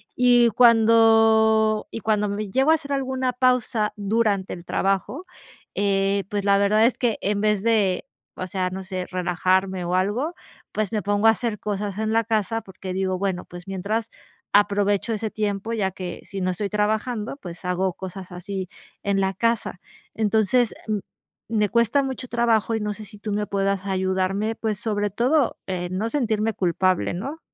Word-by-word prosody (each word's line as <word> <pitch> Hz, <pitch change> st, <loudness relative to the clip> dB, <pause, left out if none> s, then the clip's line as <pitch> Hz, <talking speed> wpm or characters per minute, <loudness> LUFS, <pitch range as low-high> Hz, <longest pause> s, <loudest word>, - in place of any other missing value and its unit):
y 245 Hz, -1 st, +5 dB
cuando 225 Hz, -1 st, +5 dB
y 225 Hz, -, -5 dB
cuando 210 Hz, -2 st, +1 dB
me 205 Hz, 0 st, -3 dB
llego 270 Hz, +6 st, +3 dB
a -, -, +6 dB
hacer 285 Hz, -2 st, -4 dB
alguna 260 Hz, -2 st, -1 dB
pausa 250 Hz, -4 st, +1 dB
durante 205 Hz, -2 st, 0 dB
el 175 Hz, -, -9 dB
trabajo, 195 Hz, -, -1 dB, 0.5 s
eh, 195 Hz, 0 st, +1 dB
pues, 205 Hz, -1 st, -2 dB
la 200 Hz, 0 st, +5 dB
verdad 215 Hz, +2 st, +4 dB
es 250 Hz, -, +2 dB
que 240 Hz, -3 st, 0 dB
en 200 Hz, 0 st, 0 dB
vez 210 Hz, -2 st, +2 dB
de, 210 Hz, -5 st, +2 dB, 0.3 s
o 185 Hz, -, -5 dB
sea, 185 Hz, 0 st, -1 dB
no 190 Hz, +1 st, -5 dB
sé, 185 Hz, -1 st, -4 dB
relajarme 185 Hz, +1 st, 0 dB
o 180 Hz, +1 st, 0 dB
algo, 225 Hz, -, 0 dB, 0.4 s
pues, 215 Hz, -1 st, -1 dB
me 210 Hz, -, 0 dB
pongo 205 Hz, +2 st, +2 dB
a -, -, +9 dB
hacer 225 Hz, -2 st, -3 dB
cosas 205 Hz, -1 st, -3 dB
en 220 Hz, 0 st, 0 dB
la 230 Hz, 0 st, +3 dB
casa 225 Hz, 0 st, 0 dB
porque 190 Hz, -2 st, -8 dB
digo 185 Hz, -1 st, -1 dB
bueno, 190 Hz, -2 st, -1 dB
pues 175 Hz, +2 st, -11 dB
mientras 210 Hz, +4 st, -2 dB, 0.4 s
aprovecho 205 Hz, +1 st, +2 dB
ese 220 Hz, 0 st, -2 dB
tiempo, 210 Hz, +1 st, -2 dB
ya 195 Hz, -4 st, 0 dB
que 180 Hz, -1 st, -7 dB
si 195 Hz, -, -6 dB
no 185 Hz, 0 st, +1 dB
estoy 200 Hz, +2 st, -3 dB
trabajando, 215 Hz, +3 st, -1 dB
pues, 175 Hz, 0 st, -9 dB
hago 180 Hz, 0 st, 0 dB
cosas 185 Hz, 0 st, -8 dB
así 185 Hz, +1 st, -5 dB, 0.3 s
en 200 Hz, -1 st, +1 dB
la 190 Hz, 0 st, 0 dB
casa, 230 Hz, -4 st, -1 dB, 0.3 s
entonces 220 Hz, +2 st, +2 dB, 0.8 s
me 210 Hz, -3 st, +1 dB
cuesta 235 Hz, +4 st, +2 dB
mucho 260 Hz, -1 st, -5 dB
trabajo 230 Hz, -2 st, +1 dB
y 220 Hz, -, -2 dB
no 210 Hz, 0 st, -2 dB
sé, 215 Hz, +1 st, -9 dB
si 210 Hz, 0 st, -11 dB
tú 210 Hz, 0 st, -5 dB
me 210 Hz, 0 st, -1 dB
puedas 195 Hz, -1 st, -1 dB
ayudarme, 190 Hz, +3 st, 0 dB
pues, 215 Hz, -3 st, -2 dB
sobre 210 Hz, -2 st, -1 dB
todo 255 Hz, +5 st, +1 dB
en 185 Hz, -1 st, -3 dB
no 225 Hz, +3 st, -1 dB
sentirme 225 Hz, -5 st, 0 dB
culpable, 185 Hz, 0 st, +1 dB
¿no? 275 Hz, -, -5 dB
210 Hz, 175 wpm, -23 LUFS, 190-225 Hz, 0.8 s, a